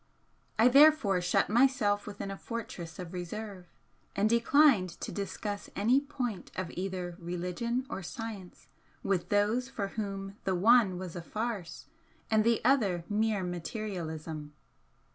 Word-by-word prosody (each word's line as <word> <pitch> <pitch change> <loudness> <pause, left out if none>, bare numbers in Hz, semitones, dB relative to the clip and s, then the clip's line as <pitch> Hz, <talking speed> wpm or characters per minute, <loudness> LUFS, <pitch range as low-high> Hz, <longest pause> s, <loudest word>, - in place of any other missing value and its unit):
I 225 +2 +6
therefore 270 -8 +6
shut 180 - +2
myself 220 -4 +2
within 200 -1 -5
a - - -4
fortress 190 -7 -6
of 180 -1 -7
reserve, 185 +1 -6 0.5
and 200 +2 +3
declined 235 -2 +4
to - - -5
discuss 205 +1 -4
any 235 +7 +4
point 250 -8 -4
of 185 -2 -3
either 180 -2 -4
religion 180 +8 -2
or 195 - -5
science 200 -1 -8 0.4
with 190 -3 0
those 215 +5 +2
for 200 -6 -3
whom 195 -2 -5
the 190 - 0
one 205 -1 +5
was 180 -2 -6
a 175 - -4
farce 210 -1 -4 0.5
and 215 -1 +4
the 230 0 +2
other 210 -10 +3
mere 210 -1 +1
materialism. 165 -5 -5
205 Hz, 135 wpm, -30 LUFS, 180-230 Hz, 0.5 s, I